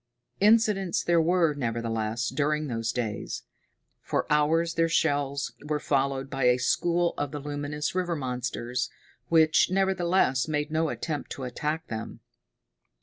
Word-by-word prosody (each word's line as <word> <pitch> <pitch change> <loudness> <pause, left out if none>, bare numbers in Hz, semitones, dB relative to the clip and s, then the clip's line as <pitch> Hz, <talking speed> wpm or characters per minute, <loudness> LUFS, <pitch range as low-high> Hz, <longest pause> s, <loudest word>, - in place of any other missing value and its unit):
Incidents 210 -3 +3
there 170 -1 +3
were, 165 -1 +3
nevertheless, 115 -3 -2
during 150 +1 0
those 115 -4 -2
days. 115 -4 -4 0.6
For - - -1
hours 165 +3 +2
their 165 0 +2
shells 140 -4 0
were 150 0 -1
followed 135 -1 0
by 135 -2 -1
a 125 0 +5
school 170 +6 +1
of 145 - -1
the 150 - -4
luminous 145 +1 -3
river 180 -2 -1
monsters, 125 -2 -3 0.4
which, 160 -1 +4
nevertheless, 185 -8 +2
made 150 -1 -1
no 160 0 +1
attempt 150 -4 -4
to 135 - -7
attack 150 +6 -3
them. 110 0 -6
150 Hz, 135 wpm, -27 LUFS, 130-165 Hz, 0.6 s, a